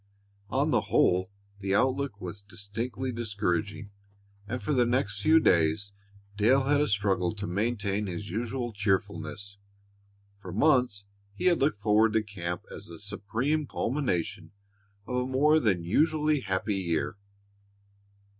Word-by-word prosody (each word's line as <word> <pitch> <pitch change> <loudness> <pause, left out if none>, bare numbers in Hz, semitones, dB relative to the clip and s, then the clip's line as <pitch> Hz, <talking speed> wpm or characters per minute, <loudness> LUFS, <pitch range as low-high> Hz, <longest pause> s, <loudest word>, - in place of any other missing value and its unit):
On - - +1
the - - +1
whole 90 +1 +3 0.3
the 100 -1 0
outlook 130 -1 +1
was 90 +1 -6
distinctly 105 +6 -4
discouraging, 105 -2 -2 0.6
and 125 +4 -3
for 150 - -2
the 125 -3 +3
next 105 -5 0
few 160 +5 +6
days 90 - +2 0.4
Dale 120 +6 +4
had 145 +2 +3
a 150 - +2
struggle 100 -3 +1
to 100 -1 -5
maintain 100 +1 -1
his 95 +3 -5
usual 120 +3 -3
cheerfulness. 100 -1 -2 0.8
For 95 -3 -8
months 125 - +2 0.3
he 180 - -4
had 175 -2 +4
looked 135 -7 0
forward 110 0 +4
to 110 -1 +2
camp 90 -4 -5
as - - -9
the 85 - -8
supreme 120 - -2
culmination 120 - -2 0.5
of 125 - -2
a 125 0 0
more 150 +4 +4
than 95 - +1
usually 155 - +2
happy 100 -2 -1
year. 85 -2 -1
105 Hz, 135 wpm, -28 LUFS, 95-125 Hz, 0.8 s, few